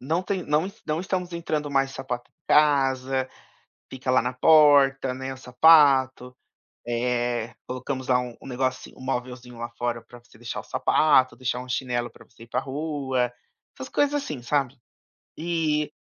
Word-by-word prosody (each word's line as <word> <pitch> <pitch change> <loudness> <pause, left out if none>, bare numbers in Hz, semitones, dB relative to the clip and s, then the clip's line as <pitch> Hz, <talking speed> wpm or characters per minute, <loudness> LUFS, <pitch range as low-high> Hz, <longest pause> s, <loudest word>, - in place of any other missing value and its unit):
Não 160 +7 -1
tem 190 -1 -2
não 150 +4 +1
es 200 - -12
não 155 +1 -1
estamos 180 -1 -3
entrando, 155 -3 -3
mais 135 -1 +1
de - - -12
sapato 125 -2 -5
em - - -52
casa, 135 -3 +2 0.6
fica 130 0 -4
lá 130 - +4
na 125 +1 -2
porta, 140 -3 +5
né, 130 +1 -5
o - - -9
sapato, 130 -1 +4 0.5
eh, 120 -1 -1
colocamos 130 +1 -5
lá 125 -1 +4
um 125 -1 -7
um - - -12
negocinho, 130 0 -3
um - - -12
móvelzinho 125 -2 -5
lá 120 0 -4
fora 120 -1 -2
pra 120 +1 -15
você 120 -2 -22
deixar 120 0 -5
o - - -13
sapato, 135 -4 +3
deixar 125 -1 -2
um 125 - -9
chinelo 120 -1 -2
pra - - -17
você 115 -1 -16
ir 115 - -21
pra - - -1
rua, 135 -4 -2 0.4
essas 130 - -8
coisas 290 0 +1
assim, 150 - -3
sabe. 135 +1 0 0.7
Eh, 155 -3 0
130 Hz, 175 wpm, -25 LUFS, 125-150 Hz, 0.7 s, porta